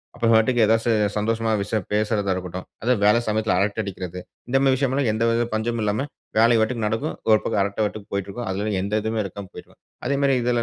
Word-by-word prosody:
அப்போ 120 Hz, -1 st, 0 dB
பாட்டுக்கு 115 Hz, +2 st, +3 dB
ஏதாவது 115 Hz, +2 st, +2 dB, 0.2 s
சந்தோஷமா 115 Hz, +2 st, 0 dB
விஷயம் 105 Hz, 0 st, -2 dB
பேசுறதா 105 Hz, -2 st, +1 dB
இருக்கட்டும். 90 Hz, 0 st, -6 dB, 0.2 s
அதாவது 120 Hz, -2 st, +1 dB
வேலை 105 Hz, +3 st, +5 dB
சமயத்துல 110 Hz, -2 st, +1 dB
அரட்டை 100 Hz, +2 st, 0 dB
அடிக்கிறது, 90 Hz, -2 st, -6 dB, 0.3 s
இந்தமாரி 135 Hz, +1 st, +3 dB
விஷயம்ல்லாம் 135 Hz, -1 st, 0 dB
எந்தவித 115 Hz, +1 st, +1 dB
பஞ்சமும் 115 Hz, +1 st, -1 dB
இல்லாம 105 Hz, +6 st, 0 dB, 0.3 s
வேலைய 115 Hz, +1 st, +5 dB
பாட்டுக்கு 110 Hz, 0 st, 0 dB
நடக்கும். 110 Hz, +9 st, -2 dB, 0.2 s
ஒரு 110 Hz, -, +6 dB
பக்கம் 100 Hz, -, 0 dB
அரட்டை 100 Hz, +2 st, -3 dB
பாட்டுக்கு 105 Hz, 0 st, -4 dB
போயிட்டுருக்கும். 100 Hz, +4 st, -4 dB
அதுல 100 Hz, +3 st, -2 dB
எந்த 100 Hz, +2 st, -4 dB
இதுவுமே 110 Hz, +1 st, -2 dB
இருக்காம 100 Hz, 0 st, -7 dB
போயிட்ருக்கும். -, -, -13 dB, 0.3 s
அதேமாரி 140 Hz, 0 st, +2 dB
இதுல 120 Hz, 0 st, +1 dB
110 Hz, 180 wpm, -23 LUFS, 100-120 Hz, 0.3 s, ஒரு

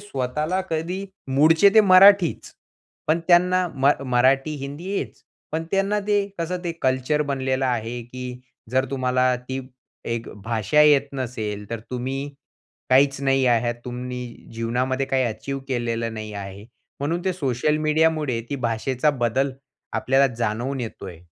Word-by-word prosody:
स्वतःला 150 Hz, +2 st, -2 dB
कधी 170 Hz, +5 st, -2 dB, 0.3 s
मूळचे 160 Hz, +7 st, +6 dB
ते 220 Hz, -, +9 dB
मराठीच, 195 Hz, -2 st, +5 dB, 0.5 s
पण 160 Hz, +2 st, +2 dB
त्यांना 180 Hz, +1 st, +4 dB
म 135 Hz, +1 st, +4 dB, 0.2 s
मराठी, 135 Hz, +4 st, +3 dB
हिंदी 145 Hz, +8 st, -6 dB
हेच, -, -, -5 dB, 0.3 s
पण 160 Hz, +1 st, -2 dB
त्यांना 195 Hz, +2 st, +1 dB
ते 205 Hz, -1 st, +2 dB
कसं 170 Hz, +2 st, -2 dB
ते 170 Hz, -, -1 dB
कल्चर 130 Hz, +3 st, +1 dB
बनलेलं 135 Hz, -2 st, -1 dB
आहे, 120 Hz, -1 st, -2 dB
की 125 Hz, +1 st, -8 dB, 0.3 s
जर 130 Hz, +1 st, +2 dB
तुम्हाला 130 Hz, -1 st, +1 dB
ती 130 Hz, 0 st, -3 dB, 0.4 s
एक 115 Hz, 0 st, -3 dB, 0.2 s
भाषा 115 Hz, +5 st, +1 dB
येत 145 Hz, -2 st, +5 dB
नसेल, 110 Hz, -6 st, -4 dB
तर 115 Hz, -1 st, -4 dB
तुम्ही 135 Hz, +3 st, -3 dB, 0.6 s
काहीच 135 Hz, +1 st, +4 dB
नाही 135 Hz, -1 st, +2 dB
आहात. 120 Hz, 0 st, +2 dB
तुम्ही 125 Hz, 0 st, -5 dB, 0.3 s
जीवनामध्ये 125 Hz, +4 st, -1 dB
काही 130 Hz, -1 st, +1 dB
अचीव्ह 135 Hz, +4 st, -4 dB
केलेलं 115 Hz, -2 st, -2 dB
नाही 110 Hz, -1 st, -6 dB
आहे. 100 Hz, 0 st, -7 dB, 0.4 s
म्हणून 165 Hz, +5 st, -2 dB
ते 190 Hz, -, +1 dB
सोशल 150 Hz, -2 st, 0 dB
मीडियामुळे 155 Hz, -5 st, +2 dB
ती 140 Hz, -, -1 dB
भाषेचा 125 Hz, +4 st, 0 dB
बदल 130 Hz, +1 st, 0 dB, 0.4 s
आपल्याला 135 Hz, +1 st, +3 dB
जाणवून 120 Hz, +4 st, -2 dB
येतोय 95 Hz, -7 st, -7 dB
130 Hz, 140 wpm, -23 LUFS, 120-155 Hz, 0.6 s, ते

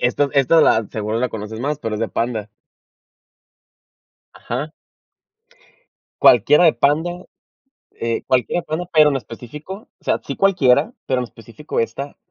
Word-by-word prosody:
Esta 140 Hz, +4 st, +2 dB
esta 140 Hz, +3 st, +4 dB
la 110 Hz, -2 st, +3 dB
seguro 110 Hz, +1 st, -3 dB
la 125 Hz, -, 0 dB
conoces 110 Hz, +1 st, -7 dB
más, 145 Hz, +2 st, -2 dB
pero 115 Hz, -6 st, -4 dB
es 105 Hz, -, -4 dB
de 115 Hz, -, -1 dB
Panda. 110 Hz, +1 st, -3 dB, 1.8 s
Ajá. 140 Hz, +7 st, -5 dB, 1.5 s
Cualquiera 145 Hz, -, +6 dB
de 165 Hz, -, +6 dB
Panda, 160 Hz, +8 st, 0 dB, 0.7 s
eh 115 Hz, 0 st, -3 dB
cualquiera 130 Hz, +6 st, +1 dB
de -, -, -24 dB
Panda, 165 Hz, +3 st, -3 dB
pero 155 Hz, -2 st, +6 dB
en 140 Hz, -, -1 dB
específico, 130 Hz, -, -8 dB, 0.3 s
o -, -, -32 dB
sea, -, -, 0 dB
sí -, -, -5 dB
cualquiera, 150 Hz, -8 st, +3 dB
pero 130 Hz, -1 st, 0 dB
en 125 Hz, -, -1 dB
específico 115 Hz, +5 st, -7 dB
ésta, 135 Hz, +5 st, -4 dB
130 Hz, 145 wpm, -20 LUFS, 115-150 Hz, 1.8 s, Cualquiera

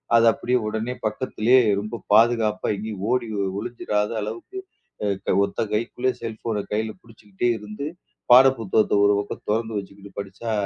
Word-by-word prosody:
அதை 115 Hz, 0 st, +6 dB
அப்படியே 125 Hz, +1 st, 0 dB
உடனே 110 Hz, +3 st, -2 dB
பக்கத்துலயே 120 Hz, +2 st, +2 dB, 0.2 s
ரொம்ப 110 Hz, +1 st, -6 dB
பாதுகாப்பா 115 Hz, -1 st, +3 dB
எங்கேயும் 105 Hz, -2 st, -6 dB
ஓடி 125 Hz, -2 st, +1 dB, 0.3 s
ஒளிஞ்சிராத 105 Hz, -2 st, -2 dB
அளவுக்கு 115 Hz, -, -6 dB, 0.7 s
அ -, -, +3 dB
ஒத்த -, -, -8 dB
கைக்குள்ளே 120 Hz, +3 st, 0 dB
செல்ஃபோன 110 Hz, -2 st, -3 dB
கைல 110 Hz, +1 st, -1 dB
புடிச்சுகிட்டே 110 Hz, 0 st, -4 dB
இருந்து 105 Hz, +7 st, -6 dB, 0.5 s
பாடப்புத்தகத்த 125 Hz, -5 st, +5 dB
ஒரு 100 Hz, 0 st, +4 dB
பக்கம் 100 Hz, -, -8 dB
தொறந்து 110 Hz, 0 st, -1 dB
வச்சுக்கிட்டு 100 Hz, +1 st, -12 dB
படிச்சா 100 Hz, +4 st, -6 dB
110 Hz, 130 wpm, -23 LUFS, 105-120 Hz, 0.7 s, அதை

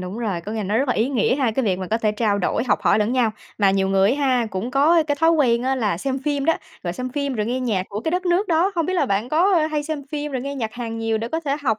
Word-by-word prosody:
đúng 185 Hz, +5 st, -6 dB
rồi, 205 Hz, -7 st, -2 dB
có 205 Hz, +5 st, -7 dB
nghĩa 225 Hz, -, -3 dB
là 210 Hz, -, -2 dB
nó 205 Hz, +4 st, 0 dB
rất 275 Hz, +2 st, 0 dB
là -, -, +2 dB
ý 225 Hz, +4 st, +1 dB
nghĩa 250 Hz, -3 st, +1 dB
ha, 265 Hz, -5 st, +1 dB
cái 255 Hz, +4 st, -1 dB
việc 190 Hz, -4 st, 0 dB
mà 185 Hz, -, -4 dB
có 225 Hz, -, 0 dB
thể 215 Hz, -2 st, +1 dB
trao 210 Hz, -2 st, 0 dB
đổi, 200 Hz, +5 st, 0 dB
học 245 Hz, -, +2 dB
hỏi -, -, +3 dB
lẫn 215 Hz, +2 st, +1 dB
nhau. 245 Hz, -3 st, +2 dB, 0.3 s
Mà 200 Hz, -2 st, +4 dB
nhiều 190 Hz, 0 st, +1 dB
người 195 Hz, +3 st, +3 dB
á 280 Hz, 0 st, 0 dB
ha, 250 Hz, -3 st, +2 dB
cũng 195 Hz, +5 st, -3 dB
có 310 Hz, +6 st, +4 dB
cái 295 Hz, -2 st, -1 dB
thói 325 Hz, 0 st, +5 dB
quen 245 Hz, -7 st, +2 dB
á 265 Hz, +1 st, +1 dB
là 210 Hz, -9 st, -1 dB
xem 265 Hz, +6 st, -2 dB
phim 285 Hz, -2 st, -1 dB
đó, 325 Hz, +2 st, +3 dB, 0.3 s
rồi 175 Hz, -, -3 dB
xem 255 Hz, +8 st, -4 dB
phim 280 Hz, 0 st, -2 dB
rồi 210 Hz, -2 st, -1 dB
nghe 250 Hz, +2 st, -1 dB
nhạc 220 Hz, -7 st, 0 dB
của 205 Hz, +1 st, -5 dB
cái 320 Hz, -, -2 dB
đất 365 Hz, +2 st, -1 dB
nước 355 Hz, +4 st, +1 dB
đó. 340 Hz, +3 st, +3 dB
Hông 330 Hz, -2 st, +1 dB
biết 370 Hz, -, -1 dB
là 330 Hz, -6 st, +2 dB
bạn 205 Hz, +3 st, -1 dB
có 355 Hz, +7 st, +3 dB, 0.2 s
hay 300 Hz, -1 st, -1 dB
xem 295 Hz, -2 st, -5 dB
phim 295 Hz, -1 st, -3 dB
rồi 260 Hz, -, -2 dB
nghe 280 Hz, +1 st, -4 dB
nhạc 225 Hz, -5 st, -3 dB
Hàn 230 Hz, -2 st, -5 dB
nhiều, 225 Hz, -1 st, 0 dB
để 230 Hz, +2 st, -4 dB
có 325 Hz, -, -2 dB
thể 285 Hz, -3 st, -1 dB
học 220 Hz, -5 st, +1 dB
250 Hz, 330 wpm, -22 LUFS, 215-290 Hz, 0.3 s, thói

